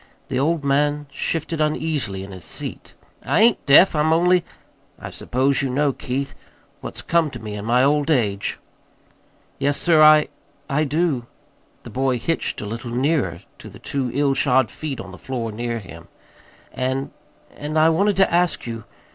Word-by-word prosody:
The 130 -2 -1
old 155 +2 +1
man 145 +1 +1
shifted 160 +3 -2
uneasily 150 -11 -1
hi 100 - -11
his 90 -2 -9
seat. - - -5 0.3
"I 140 - +2
ain't 230 0 +4
deaf. 155 +6 +7
I'm 150 +1 +2
only 175 +2 +4 0.5
I - - -8
suppose 135 +3 0
you 135 - -1
know, 140 +2 +1
Keith, 135 0 -4 0.5
what's - - -7
come 165 -2 +2
to - - -9
me 105 -1 -7
in 105 0 -6
my 125 +2 +3
old 145 +2 +2
age." 105 -9 0 1.0
"Yes, 140 +1 +1
sir, 165 -1 +4
I 155 0 +7 0.4
I 150 +2 +1
do." 145 -5 0 0.6
The - - -10
boy 130 -1 0
hitched 165 +8 -2
a - - -5
little 115 +3 -6
nearer 125 - 0 0.2
to - - -10
the - - -13
two 135 -3 -3
ill 140 -1 +2
shod 130 -2 +2
feet 150 -4 -5
on 95 - -8
the 95 - -12
floor 120 -4 -4
near 120 +2 -3
him. 85 -6 -11 0.7
"And 130 +1 -2 0.4
and 150 +2 -4
I 155 +1 +5
wanted 200 +5 +2
to 195 -2 +3
ask 175 0 +1
you. 115 -2 -6
140 Hz, 170 wpm, -22 LUFS, 120-155 Hz, 1.0 s, deaf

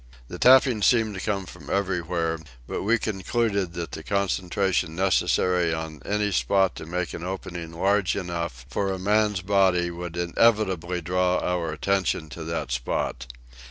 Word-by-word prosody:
The - - -7
tappings 125 -4 +6
seemed 115 -3 +3
to 95 - -5
come 100 -2 -1
from 85 -5 -12
everywhere; 85 -4 -1 0.3
but - - -3
we 115 +4 +3
concluded 100 -3 -1
that 85 -5 -5
the - - -6
concentration 95 -2 0
necessary 90 -2 +2
on 80 -3 -6
any 105 0 0
spot 95 +6 +2
to - - -8
make 90 +1 -3
an 85 - -6
opening 90 -3 -5
large 95 +2 +1
enough 85 -9 -4
for 95 +7 -1
a 95 - -2
man's 105 +1 +1
body 95 -3 +3
would 85 0 -6
inevitably 90 -1 +1
draw 90 +2 +1
our 90 -3 -1
attention 90 -1 0
to 80 - -7
that 80 -6 -3
spot. - - -2
90 Hz, 155 wpm, -25 LUFS, 85-100 Hz, 0.3 s, tappings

